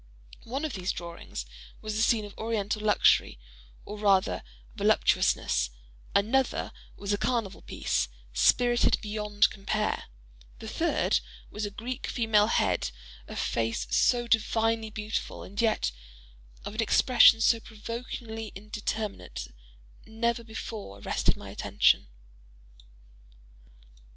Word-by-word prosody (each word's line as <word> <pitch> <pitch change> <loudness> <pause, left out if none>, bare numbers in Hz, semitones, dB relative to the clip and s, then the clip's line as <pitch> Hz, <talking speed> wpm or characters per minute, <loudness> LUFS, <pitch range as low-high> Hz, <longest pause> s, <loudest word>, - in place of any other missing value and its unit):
One 270 +6 -3
of 305 - -3
these 185 -1 -1
drawings 170 -1 -7 0.3
was 215 -1 -4
a 220 - +1
scene 220 -2 +3
of 205 - -11
Oriental 215 -2 -2
luxury, 210 - +4 0.5
or 210 +1 -7
rather 195 -2 +3 0.3
voluptuousness; - - +2 0.5
another 245 +6 +2 0.3
was 200 0 -2
a 205 - 0
"carnival 230 -5 -1
piece," - - -1 0.3
spirited 240 - +4
beyond 210 -1 +1
compare; 210 +1 -2 0.5
the - - -9
third - - +1 0.3
was 210 0 -3
a - - -5
Greek 240 +6 -5
female 220 -3 +3
head—a - - -2
face 115 - -1
so 240 - +3
divinely 225 0 +1
beautiful, 215 0 -4
and 200 +3 -4
yet 220 - +2 0.7
of - - -5
an 220 - 0
expression 230 0 +6
so 230 0 +4
provokingly 225 0 -6
indeterminate, 210 - -5 0.6
never 235 +1 -1
before 220 - -7
arrested - - 0
my - - -9
attention. - - +2
215 Hz, 110 wpm, -28 LUFS, 200-230 Hz, 0.7 s, expression